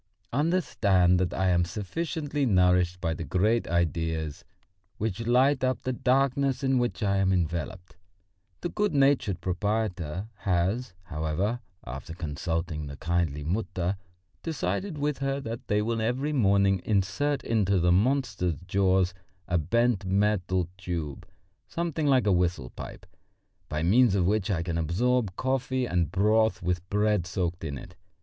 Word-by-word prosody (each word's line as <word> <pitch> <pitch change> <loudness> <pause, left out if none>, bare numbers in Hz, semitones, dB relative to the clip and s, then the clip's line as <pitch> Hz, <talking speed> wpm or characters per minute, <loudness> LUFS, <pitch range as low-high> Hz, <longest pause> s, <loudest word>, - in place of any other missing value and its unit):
Understand 105 - +3
that 90 -2 0
I 95 +1 +1
am 90 -1 +3
sufficiently 145 - -3
nourished 90 -3 +3
by 85 -2 0
the 80 - -5
great 105 +7 +1
ideas 80 -3 -1 0.5
which 110 +1 -3
light 130 +3 +3
up 130 -2 0
the 130 - -1
darkness 135 +2 +1
in 130 -1 +3
which 120 -1 -1
I 100 -1 +2
am 95 -1 +2
enveloped. 85 0 -2 0.6
The 175 - -2
good 210 -4 0
natured 130 -10 +2
proprietor 95 -2 -2
has, 95 +4 -1
however, 85 +7 -2 0.3
after 70 +6 -7
consulting 80 -1 -3
the 70 0 -8
kindly 80 -4 -1
Mutter, 90 +1 -1 0.5
decided 165 +3 -2
with 145 -1 -1
her 135 0 -1
that 115 -2 -6
they 105 0 +1
will 115 0 -1
every 130 +7 -1
morning 100 -6 +3
insert 110 +9 0
into 100 -4 +2
the 90 +1 +3
monster's 105 - +1
jaws 95 -1 +2 0.3
a 90 -1 +1
bent 115 +5 +1
metal 95 -2 +1
tube, 85 -6 -4 0.4
something 165 -3 -2
like 130 -5 +4
a 105 - +3
whistle 90 -8 0
pipe, - - -9 0.6
by 75 +1 -2
means 110 +4 +4
of 95 -3 +2
which 105 +2 +1
I 85 -4 0
can 85 -1 -2
absorb 105 +5 +1
coffee 130 0 -1
or 90 -4 +1
broth 105 +3 +2
with 90 0 -2
bread 105 -3 +1
soaked 90 -3 -2
in 70 -4 -4
it. 90 - -11
95 Hz, 145 wpm, -27 LUFS, 85-125 Hz, 0.6 s, like